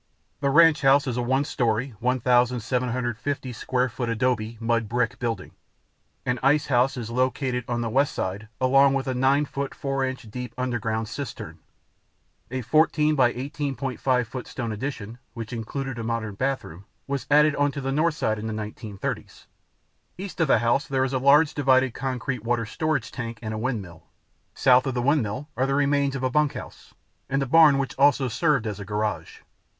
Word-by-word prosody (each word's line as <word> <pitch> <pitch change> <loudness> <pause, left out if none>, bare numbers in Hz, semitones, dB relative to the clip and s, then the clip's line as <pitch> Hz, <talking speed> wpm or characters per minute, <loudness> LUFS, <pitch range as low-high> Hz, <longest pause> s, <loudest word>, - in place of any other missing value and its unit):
The 140 -1 +1
ranch 165 +2 +6
house 140 +1 +5
is 125 -4 -2
a 125 - 0
one 130 +3 +1
story, 120 +1 -1
1,750 125 +1 0
square 125 +2 0
foot 120 0 -4
adobe 115 -1 -1
(mud 115 -1 0
bricks) 120 -1 0
building. 115 -5 -4 0.7
An 125 0 0
ice 145 +3 +3
house 125 +2 +3
is 115 -2 -5
located 125 0 0
on 120 -1 -1
the 115 - -2
west 135 +4 +2
side 100 +3 -3
along 135 +1 +4
with 135 - -1
an 130 -1 -2
9' 140 +3 +3
4" 135 -1 -2 0.2
deep 125 0 -6
underground 115 -3 -2
cistern. 140 +2 -7 0.9
A 130 0 -4
14 155 +3 +3
by 130 -4 +4
18.5 135 -2 -2
foot 125 +2 -7
stone 115 -3 -4
addition, 115 -1 -5 0.2
which 115 -1 -6
included 120 +2 -4
a - - -4
modern 115 -2 -2
bathroom, 100 -7 -3 0.2
was 140 -1 -3
added 150 +1 +5
onto 145 0 0
the 135 0 -2
north 155 +3 +1
side 110 -6 -1
in 110 - -5
the 110 - -3
1930s. 105 -1 -6 0.7
East 190 0 -7
of 165 - +3
the 135 - +5
house 120 +5 +1
there 135 -1 +1
is 135 0 -2
a 130 - +1
large, 145 +3 +5
divided 130 -3 +3
concrete 130 -2 -3
water 115 -1 0
storage 145 0 -2
tank 115 -2 -5
and 110 0 -3
a - - -3
windmill. 105 -9 -4 0.5
South 130 0 +4
of 130 - -2
the 120 - 0
windmill 135 -2 0
are 130 +2 +1
the 135 - 0
remains 140 -1 +1
of 135 - -4
a 130 - +1
bunkhouse, 150 +1 -2 0.3
and 135 +1 +1
a - - -2
barn 150 0 +6
which 135 -1 -2
also 140 -1 +4
served 125 0 +1
as 105 -2 -4
a - - -5
garage. 105 -5 -3
130 Hz, 175 wpm, -25 LUFS, 115-140 Hz, 0.9 s, ranch